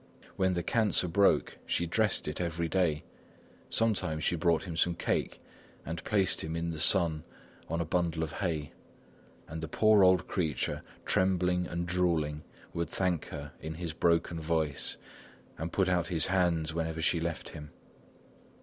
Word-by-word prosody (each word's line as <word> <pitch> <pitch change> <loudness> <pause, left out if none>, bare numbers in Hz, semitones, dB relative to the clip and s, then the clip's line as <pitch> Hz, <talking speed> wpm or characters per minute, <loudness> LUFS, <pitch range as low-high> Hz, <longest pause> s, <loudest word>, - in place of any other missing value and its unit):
When 95 -1 +2
the 85 -1 -1
cancer 105 -3 +2
broke, 100 +4 +2
she 85 - +1
dressed 105 +3 +1
it 75 +3 -3
every 85 -1 -1
day; 80 -3 +1 0.7
sometimes 90 -9 0
she - - +2
brought 85 0 +2
him 85 -4 -6
some 85 +1 +1
cake - - -1 0.5
and 80 +1 -5
placed 100 -3 +1
him 80 +1 -4
in 85 0 -2
the 80 - -5
sun 80 -4 +4 0.5
on 85 +1 -1
a 85 - 0
bundle 85 -1 0
of 80 - -4
hay; 80 -6 -3 0.7
and 80 +1 -6
the 80 - -4
poor 105 +4 +4
old 90 0 +4
creature, 80 -7 -1 0.2
trembling 90 -1 +2
and 85 0 -3
drooling, 85 -4 0 0.3
would 85 -2 -2
thank 90 -2 0
her 70 0 -7
in 80 0 -5
his 85 -1 -4
broken 85 0 +1
voice, 80 -2 -1 0.6
and 80 +2 -3
put 95 +1 +1
out 90 -2 +1
his 85 -3 +3
hands 85 -4 +1
whenever 80 0 -2
she 80 +1 +2
left 85 0 -4
him. 75 -2 -9
85 Hz, 160 wpm, -30 LUFS, 80-90 Hz, 0.7 s, sun